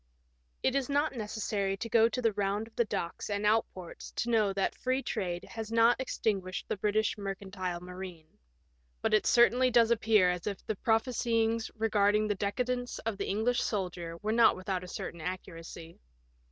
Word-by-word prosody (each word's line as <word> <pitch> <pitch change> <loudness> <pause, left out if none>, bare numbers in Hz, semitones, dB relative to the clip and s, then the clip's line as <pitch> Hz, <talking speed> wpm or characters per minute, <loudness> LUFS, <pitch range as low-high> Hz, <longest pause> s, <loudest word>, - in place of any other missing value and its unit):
It 260 - +2
is 275 -1 0
not 290 +2 +1
necessary 210 -3 -2
to 230 - -4
go 230 0 +4
the 235 -1 +1
round 200 +1 -1
of 225 - -19
the 235 - +2
docks 170 -2 -4
and 205 0 -1
outports 210 -5 -1
to 240 - -1
know 215 -3 +3
that 195 0 0
free 260 +1 -1
trade 175 -5 -3
has 225 -1 -7
not 230 +2 +4
extinguished 195 -7 -2
the - - -1
British 215 +2 0
mercantile 190 -2 -4
marine. 180 -2 -8 0.8
But - - +1
it 215 - +3
certainly 245 +1 +5
does 235 -1 +4
appear 215 -5 +4
as 180 +1 -4
if 200 -2 -4
the 220 - -2
prophesyings 230 0 +1
re 225 0 0
garding 210 0 +3
the 210 - +1
decadence 245 +5 -2
of 220 -3 -4
the - - -2
English 220 +5 +1
sailor 180 -5 -3
were 215 - 0
not 230 0 +5
without 185 0 -3
a - - -8
certain 170 -1 -6
accuracy. 165 -1 -7
210 Hz, 175 wpm, -30 LUFS, 190-230 Hz, 0.8 s, certainly